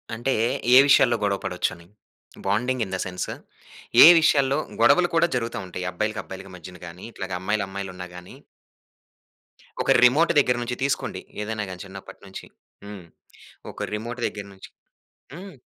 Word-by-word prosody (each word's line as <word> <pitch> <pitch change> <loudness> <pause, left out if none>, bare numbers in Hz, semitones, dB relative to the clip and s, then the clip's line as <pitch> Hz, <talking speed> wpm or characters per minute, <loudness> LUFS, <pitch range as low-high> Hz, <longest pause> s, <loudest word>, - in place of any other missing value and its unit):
అంటే, 120 +4 -1 0.4
ఏ - - +10
విషయాల్లో 120 -4 +5
గొడవ 100 -1 +1
పడొచ్చని, 90 -2 -3 0.6
బాండింగ్ 120 +5 0
ఇన్ 95 - -9
ద - - -2
సెన్స్ 90 0 -5 0.8
ఏ - - +11
విషయాల్లో, 140 -3 +2 0.2
గొడవలు 180 -1 +5
కూడా 165 +1 +4
జరుగుతా 115 -1 -3
ఉంటాయి? 90 0 -6
అబ్బాయిలకి, 105 +4 -3
అబ్బాయిలకి 95 0 -10
మధ్యన 90 +1 -11
గాని, 85 +2 -11
ఇట్లాగ 95 -1 -7
అమ్మాయిలు, 105 +2 -1
అమ్మాయిలున్నా 95 -2 -7
గాని. 90 0 -11 1.5
ఒక - - +1
రిమోట్ 145 +7 +5
దగ్గర్నుంచి 125 -2 0
తీసుకోండి. 140 -9 -2 0.2
ఏదైనా 110 0 -3
గాని 90 0 -8
చిన్నప్పట్నుంచి 95 0 -11 0.4
హ్మ్. 100 -3 -10 0.7
ఒక - - -8
రిమోట్ 120 +3 -5
దగ్గర్నుంచి. 100 -2 -9 0.6
హ్మ్. 190 +5 -10
105 Hz, 135 wpm, -24 LUFS, 95-125 Hz, 1.5 s, ఏ